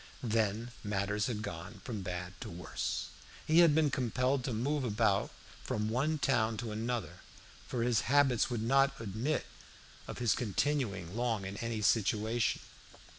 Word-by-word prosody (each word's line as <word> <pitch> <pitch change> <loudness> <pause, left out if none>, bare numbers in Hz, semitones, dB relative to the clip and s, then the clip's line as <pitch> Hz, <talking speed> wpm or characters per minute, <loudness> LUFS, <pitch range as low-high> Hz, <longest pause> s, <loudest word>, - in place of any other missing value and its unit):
Then 110 0 0
matters 105 0 0
had 110 -4 -3
gone 95 +1 -7
from 110 -5 -4
bad 90 0 -4
to - - -5
worse. 85 +1 -3 0.4
He 160 +2 +5
had 165 -4 +7
been 155 -3 +3
compelled 130 +1 +1
to 130 - -1
move 135 +6 0
about 105 -3 +2 0.3
from 105 0 -1
one 140 +7 +1
town 115 -6 +1
to 115 0 -4
another, 110 -4 -3 0.5
for 120 -2 -1
his 120 -3 +3
habits 135 -4 +4
would 120 -3 -2
not 135 +3 +3
admit 115 +8 -1 0.6
of - - -6
his 120 -3 +3
continuing 105 - -1
long 115 -4 0
in 95 +1 -5
any 115 -1 -3
situation. 110 +2 +2
115 Hz, 150 wpm, -33 LUFS, 105-130 Hz, 0.6 s, had